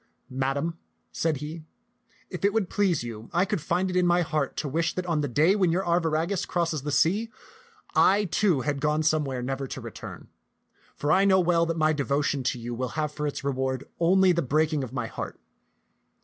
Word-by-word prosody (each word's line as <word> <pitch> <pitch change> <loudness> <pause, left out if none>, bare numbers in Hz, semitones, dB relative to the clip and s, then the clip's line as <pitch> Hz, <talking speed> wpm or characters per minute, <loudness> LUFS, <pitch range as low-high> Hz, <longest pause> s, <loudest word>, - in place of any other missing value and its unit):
"Madam," 135 +6 -2 0.3
said 160 -3 0
he, 155 +3 -7 0.7
"if 180 - -6
it 200 0 +3
would 220 -5 0
please 185 - +1
you, 115 -1 -8
I 175 +2 +2
could 200 -4 -2
find 175 +4 0
it 185 - -3
in 180 -1 +3
my 175 0 +3
heart 155 -4 -2
to 150 - -2
wish 165 +4 -1
that 185 - -2
on 165 -4 0
the 145 - -1
day 155 - +3
when 185 -5 +2
your 185 +3 0
Arviragus 170 +2 0
crossed 165 -5 -1
the 145 - -3
sea, 190 +10 +2 0.6
I, 205 +2 +4
too, 180 -5 +2
had 145 0 -2
gone 150 +1 +1
somewhere 145 -5 0
never 135 +1 -3
to - - -6
return; - - -9 0.7
for 145 - -1
I 190 +5 +5
know 190 -1 +5
well 170 -1 +2
that 165 0 -2
my 155 0 +3
devotion 140 0 0
to 125 - 0
you 120 +1 -5
will 125 +2 -2
have 150 -1 0
for 150 0 -3
its 145 - -4
reward 130 -1 -1 0.2
only 185 +2 +5
the 170 -1 +1
breaking 155 +1 +1
of 125 - -6
my 125 -3 -3
heart. - - -6
155 Hz, 205 wpm, -26 LUFS, 140-175 Hz, 0.7 s, I